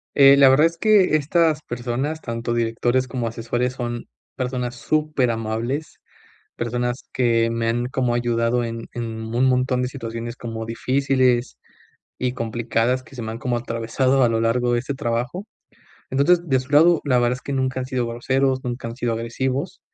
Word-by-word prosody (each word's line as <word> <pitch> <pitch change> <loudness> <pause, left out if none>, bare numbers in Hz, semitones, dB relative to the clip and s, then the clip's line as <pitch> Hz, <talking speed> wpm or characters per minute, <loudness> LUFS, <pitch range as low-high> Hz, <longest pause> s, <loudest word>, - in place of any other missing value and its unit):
Eh, 140 0 +8
la 140 -1 +7
verdad 145 +5 +6
es 165 - -8
que 205 -4 +4
estas 155 +1 +2
personas, 125 +6 -3
tanto 115 0 -3
directores 120 +2 0
como 125 -3 -3
asesores, 120 +2 -2
son 120 -2 -5 0.3
personas 125 -1 -3
superamables. 125 -2 -1 0.6
Personas 120 +1 -2
que 115 -2 +2
me 115 0 -1
han 120 +1 0
como 125 -1 0
ayudado 120 0 +1
en 115 0 -5
en 120 - -3 0.3
un 125 - +3
montón 125 0 +2
de 125 - -1
situaciones 120 -2 -6
como 115 -1 -5
difíciles 130 0 +1 0.6
y 125 -1 -1
complicadas 120 +1 -1
que 135 - -15
se 120 - -5
me 110 - -4
han 115 - -6
como 125 -1 -1
atravesado 120 +3 0
a 120 - +5
lo 115 0 0
largo 120 +2 +1
de 120 - +2
este 135 +3 -3
trabajo. 125 - -3 0.6
Entonces, 170 +6 +3
de 130 -1 +3
su 130 - -12
lado, 160 +3 +5
la 130 -3 +2
verdad 120 0 +2
es 125 - -4
que 140 - -6
nunca 130 0 -1
han 130 - -4
sido 125 -2 -1
groseros, 130 +3 0
nunca 120 -1 -4
han 115 - -6
sido 120 -3 -1
agresivos, 130 +9 -3
125 Hz, 175 wpm, -22 LUFS, 115-135 Hz, 0.6 s, Eh